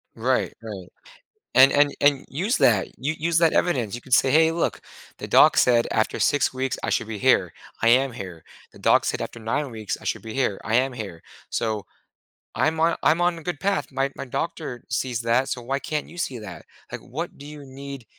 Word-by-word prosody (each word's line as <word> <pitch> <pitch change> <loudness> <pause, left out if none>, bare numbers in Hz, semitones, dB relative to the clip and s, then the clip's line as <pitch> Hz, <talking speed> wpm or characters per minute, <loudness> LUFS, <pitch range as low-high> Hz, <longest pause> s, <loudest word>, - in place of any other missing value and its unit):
Right. - - 0
Right. - - -8 0.7
And 130 +1 +8
and 145 0 +3
and 145 -1 +3
use 190 - -1
that 105 -5 +3
u 150 +5 -2
use 165 +1 +1
that 165 -1 +4
evidence. 125 - +1
You 120 - -5
could 130 - -15
say, 130 - +4
"Hey, 160 +1 +5
look. 165 +1 -1 0.4
The - - -7
doc - - +6
said 120 -2 +4
after 110 - 0
6 145 - +2
weeks, 130 -1 -2
I - - -1
should 110 - 0
be 110 -2 -5
here. 95 -9 +3 0.3
I 115 - +3
am 130 +2 +4
here. 95 -7 -8 0.3
The - - -16
doc - - +4
said - - -2
after - - -7
9 125 +5 -2
weeks, 110 -3 -4
I - - -14
should - - -2
be 110 -1 -8
here. 125 -7 0
I 115 - -1
am 130 +1 +2
here. 100 -8 -7 0.3
So 110 -3 -2 0.7
I'm 160 +1 0
on 165 +1 +3
I'm 165 - +3
on 175 -1 +1
a - - -13
good 175 -4 -4
path. 195 +1 0
My 135 +1 -1
my - - -6
doctor 135 -2 -4
sees 120 0 -1
that, 120 +3 +1
so 125 - -3
why 135 +3 -2
can't 150 +1 -3
you 175 - -13
see 130 -7 -2
that? 95 -5 -10 0.3
Like, - - -6
what - - -6
do 140 - -10
you 150 -1 -10
need" 135 -1 -9
130 Hz, 220 wpm, -24 LUFS, 115-150 Hz, 0.7 s, And